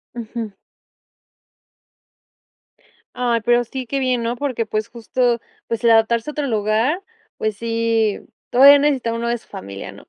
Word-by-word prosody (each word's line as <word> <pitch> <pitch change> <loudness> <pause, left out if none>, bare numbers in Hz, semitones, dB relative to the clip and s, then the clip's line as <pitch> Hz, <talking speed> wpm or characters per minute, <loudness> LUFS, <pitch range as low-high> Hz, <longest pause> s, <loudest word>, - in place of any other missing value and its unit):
Ujú. 230 -1 -5 2.6
Ay, 240 -2 0
pero, 240 +1 +3
sí 255 +2 -6
qué 275 +2 -1
bien, 255 -2 0
¿no? 235 +1 -1
Porque 250 -4 -2
pues, 215 0 -2
justo 240 +1 0 0.3
pues 230 0 -3
el 235 - +5
adaptarse 225 +3 +3
a - - -5
otro 295 -1 -2
lugar, 225 - +1 0.4
pues 215 -2 -2
sí, 230 -2 0 0.3
todavía 280 +3 +8
necesita 270 -5 +1
uno 230 +1 -3
de 240 - 0
su - - -22
familia, 100 +1 -8
¿no? - - -15
235 Hz, 150 wpm, -20 LUFS, 225-250 Hz, 2.6 s, todavía